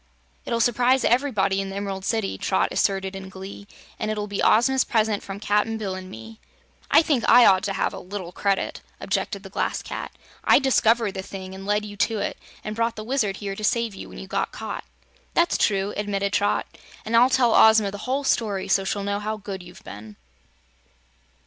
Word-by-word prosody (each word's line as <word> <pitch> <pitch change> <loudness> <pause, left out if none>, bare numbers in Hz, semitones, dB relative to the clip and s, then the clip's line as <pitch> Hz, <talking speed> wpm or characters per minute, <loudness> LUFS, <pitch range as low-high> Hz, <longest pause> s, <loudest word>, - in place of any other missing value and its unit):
"It'll 235 - -1
s'prise 245 +3 +3
ev'rybody 215 -7 +2
in 195 - -5
the 195 - -7
Em'rald 195 -1 -4
City," 220 -3 -1
Trot 190 - 0
asserted 195 -1 0
in 190 0 -8
glee, 195 +1 -9 0.3
"and 215 - -2
it'll 210 -1 -2
be 205 -1 -3
Ozma's 260 +4 +4
present 215 -3 +1
from 195 0 -7
Cap'n 210 +2 +1
Bill 200 -3 -3
and 185 0 -7
me." 220 +3 -11 0.5
"I - - +6
think 280 -7 +1
I 245 - +8
ought 190 -1 +5
to 200 - -1
have 195 - -1
a 190 - -6
little 185 -2 -7
credit," 195 +1 -1 0.2
objected - - -2
the - - -11
Glass - - -2
Cat. - - -6 0.3
"I - - +6
discovered 235 -5 +3
the 190 - -5
thing, 190 -1 -8
and 195 +1 -9
led 210 +1 +1
you 205 -1 -8
to 225 +2 +1
it, 200 - -3 0.2
and 215 - -5
brought 230 +1 0
the 215 - -6
Wizard 220 -5 -1
here 200 -2 -5
to 215 - -8
save 230 0 +1
you 195 - -9
when - - -11
you - - -7
got 190 - -2
caught." - - -6 0.5
"That's 340 0 +3
true," 200 -1 +1
admitted 200 -1 -2
Trot, 205 - +1 0.4
"and 225 - -1
I'll 245 +2 +6
tell 245 -3 +3
Ozma 220 -2 +6
the 200 - -7
whole 275 +2 0
story, 210 -7 0
so 195 - +2
she'll 200 +1 -2
know 200 0 -1
how 215 +1 -3
good 195 -2 -7
you've 175 +1 -14
been." 105 +1 -10
205 Hz, 205 wpm, -24 LUFS, 195-225 Hz, 0.5 s, I